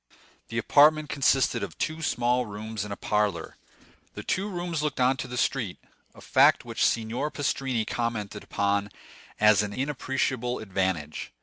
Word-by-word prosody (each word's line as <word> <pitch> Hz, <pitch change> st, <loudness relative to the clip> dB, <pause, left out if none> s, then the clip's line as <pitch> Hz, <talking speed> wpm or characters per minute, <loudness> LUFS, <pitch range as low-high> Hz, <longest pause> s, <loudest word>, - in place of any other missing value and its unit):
The -, -, -5 dB
apartment 155 Hz, +1 st, +5 dB
consisted 135 Hz, -2 st, +2 dB
of -, -, -6 dB
two 160 Hz, +1 st, -2 dB
small 125 Hz, -4 st, +1 dB
rooms 105 Hz, 0 st, -5 dB
and 105 Hz, -, -7 dB
a -, -, -3 dB
parlor. 105 Hz, 0 st, -1 dB, 0.6 s
The -, -, -6 dB
two 195 Hz, +3 st, -1 dB
rooms 175 Hz, -4 st, -3 dB
looked 150 Hz, -3 st, -2 dB
on 130 Hz, +1 st, +4 dB
to -, -, -5 dB
the 125 Hz, -, -6 dB
street—a 120 Hz, -8 st, -4 dB
fact -, -, +4 dB
which -, -, -2 dB
Signor 115 Hz, +6 st, 0 dB
Pastrini 135 Hz, -5 st, -1 dB
commented 110 Hz, -4 st, -3 dB
upon 100 Hz, 0 st, 0 dB, 0.5 s
as 105 Hz, -1 st, +6 dB
an 105 Hz, -1 st, -4 dB
inappreciable 130 Hz, -2 st, -1 dB
advantage. 95 Hz, -7 st, -2 dB
120 Hz, 145 wpm, -27 LUFS, 105-140 Hz, 0.6 s, as